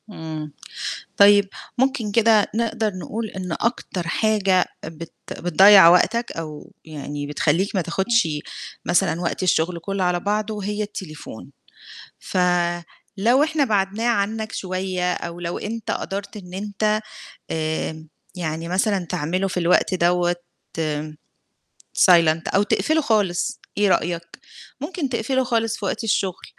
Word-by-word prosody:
إمم، 155 -5 -7 0.6
طيب 205 0 +6 0.3
ممكن 255 -5 +1
كده 220 -1 +4
نقدر 225 -2 0
نقول 215 +5 -4
إن 185 -3 -5
أكتر 190 -4 -2
حاجة 195 -2 +2 0.2
بت 160 +1 -8 0.3
بتضيّع 190 +2 +8
وقتك 230 +7 +3
أو 155 -2 -8
يعني 145 -2 -6
بتخلّيك 165 +8 0
ما 185 - +2
تاخُدش 190 +4 +1 0.6
مثلًا 175 -1 +1
وقت 175 +1 -2
الشُغل 175 -1 +1
كلّه 195 +3 -2
على 180 0 +1
بعضه 210 +1 -2
هي 210 +1 -2
التليفون، 155 - -8 0.7
ف - - -5 0.8
لو 240 +8 +4
إحنا 310 -2 +1
بَعَدناه 205 0 0
عنّك 220 0 -1
شوية 185 -1 -2
أو 170 0 -6
لو 175 0 -3
أنت 225 +1 -4
قَدرت 200 +2 -4
إن 180 -3 -11
أنت 210 +2 0 0.5
آمم، 160 0 -3 0.3
يعني 165 -2 -3
مثلًا 190 0 +1
تعمله 180 +6 -1
في 180 - -2
الوقت 180 +2 +3
دَوّة 175 0 +2 1.6
silent 165 -3 +5
أو 200 - +5
تقفله 315 +9 +1
خالص 210 - 0 0.2
إيه 205 -1 +4
رأيك؟ 170 -2 +1 0.6
ممكن 310 0 -3
تقفله 260 +2 0
خالص 225 -3 0
في - - -6
وقت 200 - -2
الشُغل 195 -4 -1
195 Hz, 125 wpm, -22 LUFS, 170-215 Hz, 1.6 s, بتضيّع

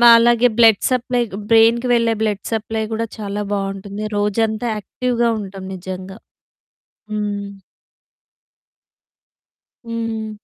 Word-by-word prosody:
మాలాగే 235 0 +7
blood 225 -3 +6
supply 250 -1 0 0.3
బ్రెయిన్‌కి 230 +2 +5
వెళ్ళే 230 -1 +2
blood 210 -3 -1
supply 220 0 -2
గూడా 225 +1 -1
చాలా 205 -1 -3
బావుంటుంది. 195 +1 -3
రోజంతా 215 +2 0
యాక్టివ్‌‌‌గా 240 +3 -1
ఉంటాం 195 -1 -8
నిజంగా 185 +1 -7 1.0
హ్మ్. 205 -1 -3 2.4
హ్మ్. 225 -1 -3
220 Hz, 90 wpm, -19 LUFS, 200-230 Hz, 2.4 s, మాలాగే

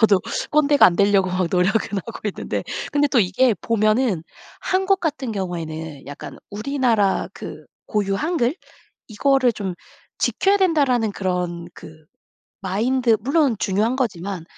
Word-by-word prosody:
저도 205 -4 +5 0.3
꼰대가 295 -1 +5
안 170 - +2
되려고 200 -2 +3
노력은 185 +3 0
하고 230 - -8
있는데 - - -4 0.3
근데 290 0 +2
또 250 -5 +3
이게 210 +5 +2
보면은 215 -4 +1 0.4
한국 385 +1 +1
같은 285 -7 -2
경우에는 160 -7 -5
약간 145 - -9
우리나라 220 -4 +1
그 155 0 -9 0.2
고유 200 -2 0
한글 305 - 0 0.5
이거를 255 +2 +2
좀 195 -4 -4 0.4
"지켜야 395 +1 +2
된다."라는 275 - +2
그런 180 -3 -3
그 155 0 -13 0.6
마인드 225 +5 +1
물론 275 0 +2
중요한 220 +3 +1
거지만 195 -8 -3
215 Hz, 285 characters per minute, -21 LUFS, 185-265 Hz, 0.6 s, 저도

